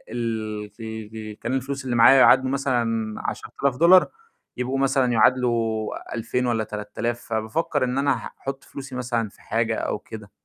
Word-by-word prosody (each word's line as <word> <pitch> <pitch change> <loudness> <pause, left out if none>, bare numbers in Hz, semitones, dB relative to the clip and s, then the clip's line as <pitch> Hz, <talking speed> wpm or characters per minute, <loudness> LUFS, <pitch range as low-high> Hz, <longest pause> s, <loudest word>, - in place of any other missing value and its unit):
ال 110 -3 -3 0.6
ال - - -15
كان 120 - -3
الفلوس 135 +1 -3
اللي 120 -2 -1
معايا 135 +4 +7
يعادلوا 130 0 +6
مثلًا 115 -5 0 0.2
10.000 140 -3 -3
دولار 180 +4 +6 0.5
يبقوا 130 +2 -2
مثلًا 135 -2 +2
يعادلوا 115 -2 +1
2000 125 +2 -1
والّا 115 -2 0
3000، 105 +3 -4
فبافكّر 130 +7 -1
إن 125 +2 -1
أنا 140 +1 +3
أحط 135 0 -7
فلوسي 135 -1 -9
مثلًا 120 -3 -1
في - - -22
حاجة - - 0
أو - - -2
كده. 105 -3 -10
120 Hz, 150 wpm, -24 LUFS, 110-135 Hz, 0.6 s, معايا